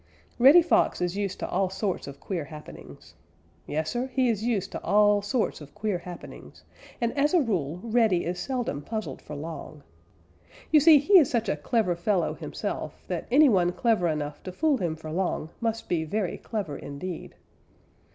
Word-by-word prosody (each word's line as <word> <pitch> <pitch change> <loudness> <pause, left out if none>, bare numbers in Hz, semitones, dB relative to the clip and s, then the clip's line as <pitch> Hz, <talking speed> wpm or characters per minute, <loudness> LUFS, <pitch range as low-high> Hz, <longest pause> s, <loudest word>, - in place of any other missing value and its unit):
_ - - -33 0.4
Reddy 285 +8 +8
Fox 340 - +2
is 180 +1 -1
used 200 -2 -2
to - - -2
all 190 -1 0
sorts 190 -3 -3
of 140 0 -9
queer 170 -3 -4
happenings. 150 +1 -12 0.5
Yes, 155 +1 -2
Sir, 245 +2 -2
he 260 -1 +1
is 220 -2 -1
used 215 -5 -1
to - - -5
all 205 0 +4
sorts 215 -3 -1
of 145 +4 -13
queer 210 -3 -1
happenings, 175 -1 -11 0.4
and 235 +1 -1
as 295 +4 +2
a - - +6
rule 180 - -1
Reddy 225 -6 +2
is 180 +1 -3
seldom 245 - -3
puzzled 220 +6 -5
for 150 - -8
long. 155 -1 -8 0.9
You 310 - +7
see 310 +1 +8
he 365 +8 +6
is 295 - +3
such 230 -3 0
a 190 - +1
clever 180 +4 0
fellow 180 +1 0
himself - - -5
that - - -4
any 290 +5 +6
one 180 -7 +3
clever 220 -6 +2
enough 150 -2 -3
to 185 - -7
fool 295 - +1
him 170 -7 -2
for 155 0 -8
long 175 -2 -2
must 225 -1 -2
be 165 -2 0
very 185 +3 -2
clever 200 -10 -4
indeed. 155 +5 -7
195 Hz, 185 wpm, -27 LUFS, 165-235 Hz, 0.9 s, Reddy